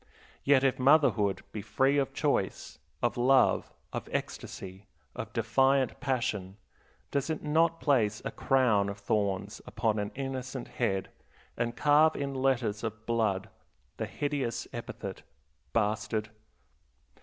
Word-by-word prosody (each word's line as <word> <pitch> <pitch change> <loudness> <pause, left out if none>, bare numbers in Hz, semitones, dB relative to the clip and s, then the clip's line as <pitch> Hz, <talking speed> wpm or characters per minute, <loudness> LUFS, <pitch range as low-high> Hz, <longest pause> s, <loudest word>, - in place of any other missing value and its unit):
Yet, 135 -1 +5
if 135 -1 +2
motherhood 130 -8 +4
be 110 - -5
of 100 - -8
free 140 +1 +3
choice, - - -1 0.2
of 120 +1 +1
love, 130 +2 +4 0.2
of - - -4
ecstasy, 95 +2 -5 0.3
of - - -5
defiant 135 0 +2
passion, 115 -8 -2 0.5
does 140 +1 -1
it 160 - -2
not 165 +2 +2
place 110 -8 +2
a - - -2
crown 120 -7 +2
of 100 - -5
thorns 100 -1 -1
upon 110 -1 0
an 105 +1 -3
innocent 130 -1 -4
head 95 -6 -1 0.4
and 120 0 -2
carve 150 +2 +5
in 140 -1 -3
letters 130 -6 0
of 110 -1 -5
blood 110 -5 0 0.5
the - - -2
hideous 140 -5 -2
epithet, - - -6 0.5
Bastard? 110 0 0
120 Hz, 125 wpm, -30 LUFS, 105-135 Hz, 0.5 s, Yet